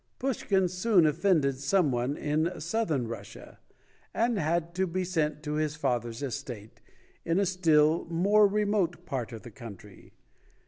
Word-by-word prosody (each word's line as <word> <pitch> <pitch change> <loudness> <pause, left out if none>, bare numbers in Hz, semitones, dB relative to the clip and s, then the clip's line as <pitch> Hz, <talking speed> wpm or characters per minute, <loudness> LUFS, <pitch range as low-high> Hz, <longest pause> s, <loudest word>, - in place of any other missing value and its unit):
Pushkin 200 -7 0
soon 185 0 +3
offended 150 -4 +2
some 170 0 +2
one 125 +4 -1
in 155 +4 -1
Southern 160 - -1
Russia, 115 0 -9 0.6
and 230 -2 +1
had 170 +1 -1
to 190 +1 0
be 185 +2 -2
sent 155 -4 -1
to 150 0 -3
his 155 0 -1
father's 120 -4 -2
estate, 120 -5 -6 0.4
in 165 +1 0
a 200 - +2
still 165 -3 +3
more 200 +6 +4
remote 200 -4 0
part 130 -3 -4
of 115 -2 -9
the 120 - -10
country. 110 -4 -12
160 Hz, 145 wpm, -28 LUFS, 140-185 Hz, 0.6 s, more